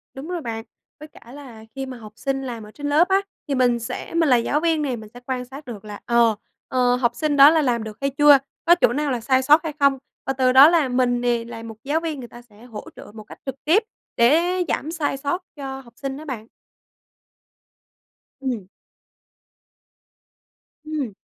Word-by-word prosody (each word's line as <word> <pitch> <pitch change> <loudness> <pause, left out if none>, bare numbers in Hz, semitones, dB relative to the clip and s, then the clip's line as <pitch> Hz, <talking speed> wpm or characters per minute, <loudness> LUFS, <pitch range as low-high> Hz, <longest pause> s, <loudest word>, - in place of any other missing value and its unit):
Đúng 270 +3 -8
rồi 355 -1 -4
bạn. 225 -4 -5 0.4
Với 305 - -10
cả 240 -5 -17
là 255 -6 -11
khi 270 0 -4
mà 260 -1 -8
học 215 -2 -12
sinh 270 +1 -2
làm 235 -4 -6
ở 210 - -12
trên 290 +4 -5
lớp 310 +5 +4
á, 385 +1 +3 0.3
thì 280 - -1
mình 245 -2 +2
sẽ 230 - -6
mình 330 -2 +2
là 250 - +6
giáo 285 +5 0
viên 325 -2 +1
nè, 270 -4 -1
mình 220 -2 -10
sẽ 245 - -11
quan 255 -1 -3
sát 275 +3 -11
được 220 -4 -9
là, 210 -1 -8
ờ, 235 -2 +3 0.3
ờ, 250 -1 +2
học 240 -1 0
sinh 305 -2 0
đó 275 +1 +10
là 320 0 +3
làm 240 -5 0
được 215 -1 -8
hay 275 - +1
chưa, 290 +1 +6 0.3
có 345 - +7
chỗ 235 - +4
nào 295 +1 -1
là 245 - -1
sai 260 +3 +2
sót 295 +5 +5
hay 315 -2 -4
không? 280 -1 +4 0.3
Và 270 - -1
từ 260 -1 +2
đó 270 +4 +9
là 330 -5 +3
mình 250 -1 +1
nè, 240 -1 +1
là 230 -1 -8
một 225 -1 -8
giáo 295 +3 0
viên, 320 -3 -4
người 245 - -8
ta 240 - -13
sẽ 220 -2 -20
hỗ 220 -4 -9
trợ - - -12
một 215 -1 -10
cách - - -14
trực 270 -2 -4
tiếp, 370 +9 +4 0.3
để 250 +8 +5 0.3
giảm 310 - -2
sai 310 -4 -2
sót 285 +7 -2
cho 270 -2 -6
học 235 -2 -18
sinh 275 -1 -5
đó 310 - -10
bạn. 235 -7 -6 1.9
Ừm. 245 -8 -3 2.2
Ừm. 295 -8 -3
265 Hz, 215 wpm, -22 LUFS, 235-295 Hz, 2.2 s, đó